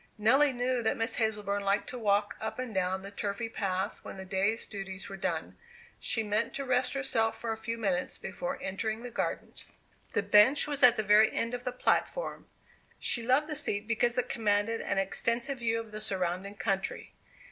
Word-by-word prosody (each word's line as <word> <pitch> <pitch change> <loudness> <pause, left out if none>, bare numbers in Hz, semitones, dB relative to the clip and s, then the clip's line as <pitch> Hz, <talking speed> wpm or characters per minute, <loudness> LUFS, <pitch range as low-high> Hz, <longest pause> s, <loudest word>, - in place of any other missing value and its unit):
Nelly 265 +7 +4
knew 250 0 0
that 220 - 0
Miss 225 0 0
Hazleburn 210 -3 0
liked 200 +1 +1
to 250 - -6
walk 205 -1 +1
up 220 - -3
and 250 -3 -4
down 190 0 0
the 200 - -8
turfy 205 +3 -3
path 190 -3 -2
when - - -9
the 190 - -7
day's 195 +4 0
duties 195 -2 -6
were 195 - -7
done. 175 -4 -3 0.4
She 225 -2 0
meant 215 +2 0
to 275 - -3
rest 255 0 +1
herself 235 -5 0
for 230 - -3
a - - -1
few 230 +1 -4
minutes 190 -5 -1
before 270 +1 -4
entering 220 +4 -2
the 245 - -6
garden. - - -3 0.6
The - - +1
bench 225 +8 +6
was 290 -2 -2
at 245 -2 +8
the 220 - -1
very 210 +1 +6
end 230 +1 -2
of 245 +1 -5
the 250 - -1
platform. - - -1 0.5
She 235 - +2
loved 260 +6 +3
the 305 -1 -4
seat 205 -6 -1
because 235 +1 +2
it 250 - +1
commanded 215 0 +1
an 200 - -2
extensive 235 +7 -1
view 230 -1 0
of 225 -1 -8
the 215 0 -6
surrounding 190 0 -2
country. 195 +1 -2
220 Hz, 195 wpm, -30 LUFS, 200-245 Hz, 0.6 s, at